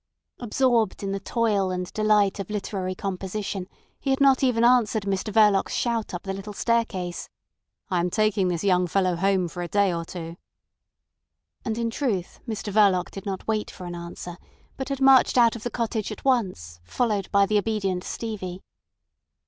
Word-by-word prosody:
Absorbed 235 -4 +1
in 195 - -2
the 195 - -2
toil 205 -2 0
and 180 -1 -4
delight 210 -2 +2
of 195 - -5
literary 195 -3 -3
composition, 195 0 -4 0.3
he 275 - -3
had 265 - +2
not 275 -1 +5
even 240 -3 +2
answered 235 -3 +4
Mr 200 +2 -2
Verloc's 210 -2 +4
shout 235 -3 -1
up 175 -2 -5
the 195 - -3
little 195 +2 -7
staircase. 200 -6 -1 0.6
"I 180 - +2
am 175 +1 0
taking 215 -1 +1
this 175 0 -1
young 180 -2 +3
fellow 185 0 +1
home 190 0 +1
for 175 +1 -7
a 175 - -3
day 200 -1 +2
or 170 0 -2
two." 165 0 -8 1.3
And, 220 -1 -2
in 230 -1 -1
truth, 220 - -2
Mr 210 -2 -4
Verloc 195 -4 +3
did 195 +1 -8
not 190 -1 -4
wait 215 -1 -1
for 185 - -10
an 175 - -5
answer, 170 0 -7 0.4
but 265 0 -5
had 275 -1 -3
marched 270 -1 +6
out 235 -1 +5
of 230 - -7
the 240 - -3
cottage 225 -2 -2
at 215 - -9
once, 180 - 0
followed 205 - -1
by 200 0 +5
the 210 +1 +2
obedient 195 -4 -1
Stevie. 190 -5 -5
200 Hz, 180 wpm, -25 LUFS, 185-225 Hz, 1.3 s, marched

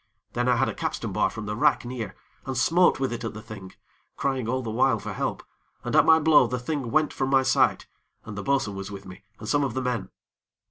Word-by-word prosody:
Then 120 +1 0
I 125 - +4
had - - +2
a - - -2
capstan - - -3
bar - - +2
from 115 -1 -7
the 105 +1 -3
rack 145 +2 +2
near, 120 -5 -5 0.3
and 135 -1 -3
smote 170 +6 +4
with 135 -2 -1
it 120 - -5
at 115 -2 -4
the 105 - -7
thing, 95 -3 -10 0.4
crying 130 -4 -1
all 130 +1 -1
the 110 - -4
while 110 - +3
for - - -6
help, - - -3 0.4
and - - -2
at - - +5
my 160 - +8
blow 155 -5 +5
the 125 +2 -2
thing 130 0 -3
went 155 +5 +1
from 135 0 -1
my 135 -1 +4
sight, 130 0 +2 0.4
and 105 - -7
the 105 - -4
bo'sun 135 -3 0
was 95 0 -6
with 100 -1 -9
me, 95 +1 -12
and 105 - -9
some 145 +4 +2
of 130 -4 -2
the 130 - -1
men. 125 -5 -2
125 Hz, 245 wpm, -26 LUFS, 110-135 Hz, 0.4 s, my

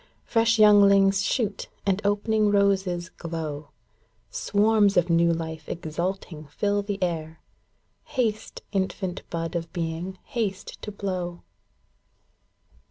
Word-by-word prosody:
Fresh 230 0 +3
younghngs 200 -2 +6
shoot, 200 0 -1 0.2
and 195 0 +1
opening 210 +1 +2
roses 190 -3 +1
glow! 155 -4 -6 0.6
Swarms 210 -1 +3
of 175 0 +3
new 170 0 +4
life 160 -1 -4
exulting 170 -1 -4
fill 205 +7 0
the 200 0 -3
air, 160 -2 -2
ŌĆö - - -38
Haste, 225 -5 -1
infant 190 -2 -2
bud 165 0 -3
of 165 -1 -3
being, 170 +2 -3
haste 205 -5 -4
to 210 - -6
blow 185 -4 -4
190 Hz, 110 wpm, -26 LUFS, 170-205 Hz, 0.6 s, younghngs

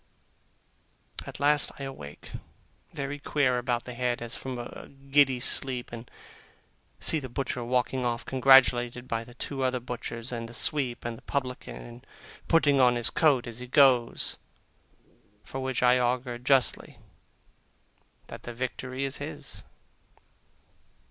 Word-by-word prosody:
At - - -8
last 145 0 +3
I 140 - -7
awake, 75 - -9 0.6
very 140 +1 -4
queer 140 -4 +1
about 120 -1 -1
the 125 - -8
head, 120 0 -1
as 120 -1 -5
from 130 -1 -5
a 120 - -8
giddy 135 -1 +2
sleep, 130 0 +2
and 115 +1 -9 0.9
see 160 - +4
the 130 -3 -7
butcher 125 -1 -3
walking 125 +1 0
off, 120 -1 -2
congratulated 125 -2 +4
by 115 0 -2
the 120 +1 -15
two 135 +1 -4
other 130 -1 +1
butchers 120 0 -5
and 115 -1 -5
the 120 - -8
sweep 130 -5 0
and 115 -1 -5
publican, 130 -3 -3
and 120 +2 -12 0.4
putting 145 -4 +4
on 125 -1 +5
his 120 -2 0
coat 140 -6 +3
as 120 0 -6
he 125 - -7
goes; 130 -3 +3 1.0
from 135 - -6
which 130 -1 -1
I 125 0 +5
augur, 125 0 -1
justly, 130 0 +2 1.3
that - - -10
the 120 - -8
victory 130 +1 -4
is 135 0 -3
his. - - -7
125 Hz, 140 wpm, -28 LUFS, 120-135 Hz, 1.3 s, on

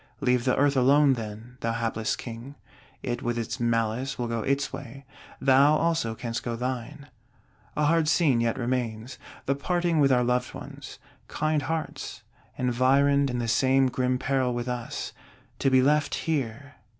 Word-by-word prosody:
Leave 125 -3 +1
the 130 - +3
Earth 140 0 +3
alone, 140 +2 +5
then, 115 +2 -7
thou 115 0 -1
hapless 115 -1 -1
King; 120 +4 -8 0.5
it 120 -1 -3
with 120 0 -2
its 115 +2 -3
malice 115 +3 0
will 120 - -2
go 115 -1 -2
its 140 +5 -1
way, 135 0 -8 0.3
thou 135 +3 +5
also 160 -8 0
canst 115 0 -4
go 120 -1 -3
thine. 130 +4 -4 0.7
A 150 - +1
hard 165 0 +3
scene 145 -5 +3
yet 115 -1 0
remains: 120 -1 -3 0.3
the 140 - +2
parting 175 +3 0
with 140 -2 +4
our 125 -1 +4
loved 125 0 0
ones. - - -9 0.3
Kind 155 -1 0
hearts, 160 +3 -4 0.3
environed 135 +3 +3
in 125 - -2
the 120 -1 -2
same 130 +2 +3
grim 125 0 0
peril 130 -2 0
with 120 +1 -3
us; 125 -1 -4 0.5
to 135 - +2
be 130 -1 +4
left 150 +2 +2
here! 140 -3 -3
130 Hz, 160 wpm, -26 LUFS, 120-140 Hz, 0.7 s, alone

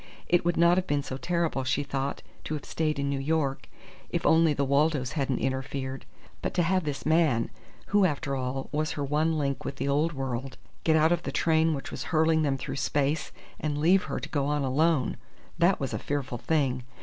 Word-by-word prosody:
It 175 - +3
would 175 0 +1
not 170 +1 +5
have 185 - 0
been 145 -1 0
so 130 - -5
terrible, 170 -3 -1
she 130 +3 0
thought, 135 0 -3 0.2
to 155 - -2
have 145 - -7
stayed 155 -1 -1
in 140 0 -1
New 140 -1 -1
York 140 -1 -1 0.4
if - - -2
only 160 0 +5
the 140 -1 0
Waldos 140 -1 +2
hadn't 135 -5 -1
interfered. 135 0 -3 0.3
But - - -3
to 175 - +3
have 185 0 +1
this 145 -2 -4
man 155 -7 +2 0.4
who, 205 -1 +4
after 145 -4 -1
all, 130 +1 -3
was 155 +1 -1
her 145 - -3
one 155 +3 +1
link 140 -1 -1
with 140 - -4
the 135 +1 -3
old 150 +4 +1
world 135 -1 -4 0.3
get 160 - +3
out 160 +1 +4
of 175 - +2
the - - -4
train 160 -1 +2
which 135 - -6
was - - -5
hurling 160 0 +3
them 140 -3 +1
through 130 - -5
space 145 +2 0 0.3
and 150 -1 -2
leave 180 +5 +4
her - - -3
to - - -7
go 140 -3 0
on 145 -1 0
alone! 145 +1 +2 0.4
That 175 +3 +4
was 135 - -3
a - - -2
fearful 135 -4 -3
thing. 135 -5 +1
145 Hz, 210 wpm, -28 LUFS, 135-160 Hz, 0.4 s, not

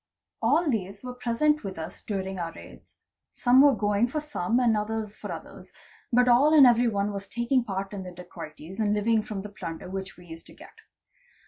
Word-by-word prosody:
All 295 +9 +3
these 200 -5 -2
were 250 0 -6
present 250 +5 +1
with 190 -3 -6
us 160 +1 -7
during 190 -2 -4
our 165 -1 -3
raids—some 250 +1 -1
were 285 -2 +6
going 205 +2 +1
for 305 +5 -2
some 250 -7 -1
and 235 -3 +3
others 215 0 -3
for - - -7
others, - - -10 0.4
but 250 +1 +4
all 275 +6 +5
and 285 -3 +9
every 240 0 +5
one 205 -2 0
was 200 0 -6
taking 235 +4 0
part 195 -2 -4
in 200 - -5
the 185 - -7
dacoities 175 +1 -10
and 210 -1 +2
living 220 +1 +2
from 210 -2 -6
the 210 - -7
plunder 175 -3 -7
which 190 0 -6
we 180 - -15
used 165 -1 -11
to - - -15
get. - - -14
210 Hz, 200 wpm, -27 LUFS, 190-245 Hz, 0.4 s, and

